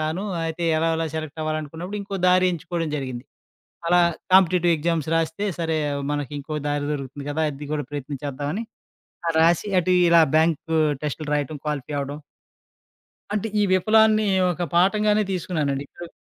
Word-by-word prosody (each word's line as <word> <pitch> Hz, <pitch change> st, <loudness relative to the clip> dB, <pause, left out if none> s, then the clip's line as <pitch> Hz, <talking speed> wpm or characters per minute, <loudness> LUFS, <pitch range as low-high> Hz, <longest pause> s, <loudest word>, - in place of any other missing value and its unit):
కాను. 160 Hz, +6 st, -2 dB, 0.2 s
అయితే, 165 Hz, +1 st, -3 dB
ఎలాగొలా 165 Hz, 0 st, 0 dB
సెలెక్టవ్వాలనుకున్నప్పుడు 155 Hz, +4 st, -4 dB
ఇంకో 195 Hz, -1 st, -5 dB
దారి 185 Hz, 0 st, +5 dB
ఎంచుకోడం 170 Hz, -1 st, -3 dB
జరిగింది. 130 Hz, -3 st, -5 dB, 0.6 s
అలా 175 Hz, +1 st, +5 dB, 0.3 s
కాంపిటిటివ్ 180 Hz, -2 st, +5 dB
ఎగ్జామ్స్ 160 Hz, -1 st, -1 dB
రాస్తే, 165 Hz, +4 st, -1 dB
సరే 160 Hz, -1 st, 0 dB, 0.3 s
మనకింకో 145 Hz, +1 st, -4 dB
దారి 145 Hz, 0 st, -1 dB
దొరుకుతుంది 140 Hz, 0 st, -5 dB
గదా! 155 Hz, +2 st, 0 dB
అది 140 Hz, +1 st, -8 dB
గూడా 145 Hz, -3 st, -2 dB
ప్రయత్నం 145 Hz, -1 st, -5 dB
చేద్దామని 145 Hz, -, -3 dB, 0.7 s
ఆహ్, 165 Hz, -, -1 dB
రాసీ 170 Hz, +5 st, +3 dB
అటు 180 Hz, +1 st, +1 dB, 0.2 s
ఇలా 170 Hz, 0 st, +7 dB
బ్యాంకూ 160 Hz, 0 st, +2 dB, 0.3 s
టెస్టులు 150 Hz, 0 st, -3 dB
రాయటం, 145 Hz, +1 st, -2 dB
క్వాలిఫై 150 Hz, -1 st, -3 dB
అవ్వడం 140 Hz, +1 st, -5 dB, 1.2 s
అంటే, 215 Hz, +1 st, -1 dB
ఈ -, -, +4 dB
విఫలాన్ని 215 Hz, +3 st, +4 dB, 0.3 s
ఒక 175 Hz, +1 st, -5 dB
పాఠంగానే 210 Hz, +4 st, +3 dB
తీసుకున్నానండి. 150 Hz, -6 st, -2 dB
ఇప్పుడు 170 Hz, -1 st, -10 dB
160 Hz, 135 wpm, -23 LUFS, 145-180 Hz, 1.2 s, ఇలా